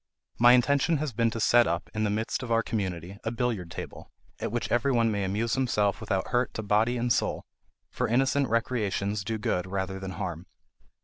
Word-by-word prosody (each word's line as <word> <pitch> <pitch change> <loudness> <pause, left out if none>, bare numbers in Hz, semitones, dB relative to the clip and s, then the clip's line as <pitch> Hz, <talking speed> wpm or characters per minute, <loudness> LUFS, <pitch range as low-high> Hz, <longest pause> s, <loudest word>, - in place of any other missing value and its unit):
My 120 +1 +8
intention 140 +5 +3
has 145 -3 -3
been 115 +1 +2
to 115 - -5
set 120 +2 +5
up, 85 - -2
in 110 0 -1
the - - +1
midst 110 +5 -2
of 125 -3 -5
our 115 0 +3
community, 95 -2 -4
a - - -1
billiard 115 -7 -2
table, - - -8 0.3
at - - -3
which 120 +1 -2
every 120 +3 +2
one 115 -3 +2
may 100 -1 -1
amuse 105 +5 -1
himself 110 -6 +1
without 95 -1 -1
hurt 125 0 0
to 110 - -3
body 110 +4 +2
and 120 0 +2
soul; - - -1 0.5
for - - -1
innocent 135 +3 +2
recreations 105 -3 -1
do 110 +3 -2
good 90 -4 -1
rather 95 0 -3
than 95 0 -6
harm. 85 -2 -5
110 Hz, 200 wpm, -28 LUFS, 100-120 Hz, 0.5 s, My